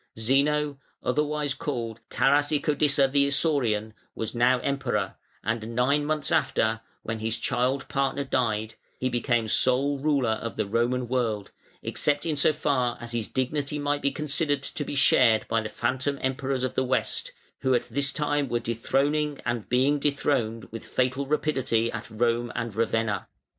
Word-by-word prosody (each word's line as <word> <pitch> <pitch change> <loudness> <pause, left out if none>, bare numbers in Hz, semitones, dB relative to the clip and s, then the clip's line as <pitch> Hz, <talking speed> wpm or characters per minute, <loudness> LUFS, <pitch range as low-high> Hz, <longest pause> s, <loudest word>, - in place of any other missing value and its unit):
Zeno, 140 +4 +1 0.2
otherwise 150 +1 0
called 115 -7 -4
Tarasicodissa 145 0 +2
the 140 0 +3
Isaurian, 125 -8 +1 0.2
was 110 -1 -4
now 120 +2 +4
Emperor, 140 0 -1 0.3
and 115 +1 -2
nine 140 +4 +2
months 155 -1 -1
after, 110 0 +1 0.2
when 115 0 -3
his 110 +1 -2
child 125 +3 0
partner 140 0 0
died, 110 -5 0 0.3
he 130 - 0
became 120 -2 +1
sole 135 +5 +2
ruler 140 -5 +2
of 115 +1 -3
the 110 - +1
Roman 120 +4 0
world, 115 -5 -1 0.3
except 145 0 +1
in 160 -2 0
so 145 - +3
far 140 -5 0
as 120 0 -7
his 115 -2 -2
dignity 140 +3 -2
might 145 0 -1
be 140 - +2
considered 145 -1 0
to 145 - -3
be 145 - -5
shared 120 -5 +4
by 115 0 +1
the 110 - -5
phantom 130 +5 -1
Emperors 130 0 -1
of 130 - -1
the 130 - +1
West, 130 0 -1 0.3
who 130 -1 +2
at 120 - -1
this 140 +3 0
time 145 -3 0
were 120 0 +1
dethroning 140 +6 0
and 120 -3 -2
being 135 +4 +3
dethroned 130 -6 0
with 115 - -7
fatal 130 +2 -1
rapidity 130 -6 +1
at 115 -1 -6
Rome 120 +2 0
and 115 -2 -3
Ravenna. 115 -2 0
130 Hz, 160 wpm, -26 LUFS, 115-145 Hz, 0.3 s, now